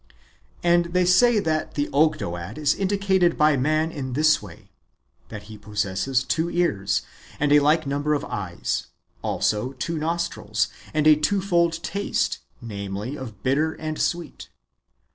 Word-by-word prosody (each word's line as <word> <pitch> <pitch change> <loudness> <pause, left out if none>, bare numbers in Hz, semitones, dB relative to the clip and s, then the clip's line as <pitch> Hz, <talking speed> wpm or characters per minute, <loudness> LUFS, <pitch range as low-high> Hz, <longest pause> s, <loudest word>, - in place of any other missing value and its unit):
And 175 0 +4
they 180 0 +3
say 220 +6 +5
that 160 -5 -1
the 145 0 0
Ogdoad 105 - 0
is 150 -2 +2
indicated 190 -3 +1
by 150 -1 +4
man 155 +4 +1
in 130 -5 -5
this 155 +2 +3
way: 95 -6 -13 0.6
that 105 - -8
he 110 0 -11
possesses 105 +5 -1
two 165 +4 0
ears, 165 - 0 0.4
the 145 0 +5
like 150 +2 +3
number 145 +2 0
of 145 - -3
eyes, 95 -4 -3 0.3
also 110 +5 -1
two 160 +5 -3
nostrils, 160 -9 -1 0.2
and 155 -1 0
a 155 0 +8
twofold 170 -1 +1
taste, 200 0 -1 0.2
namely, 100 +3 -5
of 115 -8 -9
bitter 150 +5 +1
and 155 -1 -4
sweet. 175 -1 -3
150 Hz, 140 wpm, -24 LUFS, 115-170 Hz, 0.6 s, a